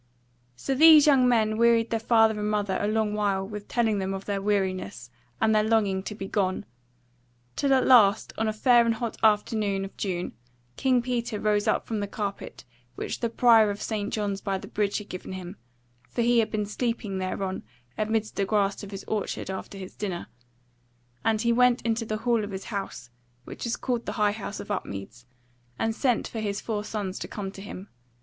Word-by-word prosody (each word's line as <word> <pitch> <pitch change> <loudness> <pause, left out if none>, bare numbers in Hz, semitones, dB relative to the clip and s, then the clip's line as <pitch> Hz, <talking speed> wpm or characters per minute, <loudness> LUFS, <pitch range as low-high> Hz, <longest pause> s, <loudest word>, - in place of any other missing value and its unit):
So 270 - -2
these 310 +1 +8
young 270 -4 +5
men 220 -2 +2
wearied 235 -1 +4
their 225 - +1
father 225 -1 +3
and 210 0 -1
mother 205 -2 0
a 205 - 0
long 215 0 0
while 200 -2 0
with 210 0 -7
telling 225 -4 +1
them 190 0 -2
of 195 - -7
their 200 -1 -2
weariness, 185 - -2 0.3
and 220 0 +3
their 215 - +4
longing 210 -3 +1
to 210 +2 -6
be 195 -1 -6
gone: 190 -2 -1 0.9
till 280 - +1
at 260 -1 +4
last 220 -5 +5
on 225 - -1
a - - +1
fair 240 +2 +4
and 230 -1 +1
hot 230 0 -4
afternoon 210 -2 +2
of 195 - -11
June 180 -3 -3 0.4
King 255 -2 +2
Peter 235 -4 -2
rose 210 0 +1
up - - +1
from 220 -2 -3
the 205 - -2
carpet 200 -1 -5 0.3
which - - -4
the 235 - -1
Prior 225 -2 +5
of 205 0 -4
St. 210 -2 -3
John's 205 -2 -2
by 195 -1 -1
the - - -9
Bridge 205 -1 -1
had 210 - -7
given 185 0 -7
him 185 0 -7 0.5
(for 235 - -1
he 240 0 +4
had 220 - +1
been 210 -1 -1
sleeping 210 -2 -3
thereon 185 0 -3 0.3
amidst 215 0 -1
the 195 - +1
grass 200 -1 0
of 200 - -8
his 195 -1 -7
orchard 205 -2 -3
after 190 +1 -7
his 190 -1 -9
dinner) 190 -5 -4 1.0
and 220 -1 +1
he 235 0 +2
went 250 0 +4
into 230 0 0
the 215 0 -2
hall 230 -1 +1
of 205 - -5
his 195 -1 -6
house, 195 -10 -5 0.3
which - - -7
was 235 - -1
called 245 -2 -2
the - - -2
High 210 -2 +2
House 205 -1 -6
of - - -7
Upmeads, 120 - -6 0.5
and 225 - 0
sent 245 0 0
for 225 - -6
his 205 -2 -2
four 210 -2 -3
sons 205 -3 -4
to - - -5
come 195 -2 -5
to 195 - -11
him. 200 -1 -8
210 Hz, 205 wpm, -26 LUFS, 195-225 Hz, 1.0 s, these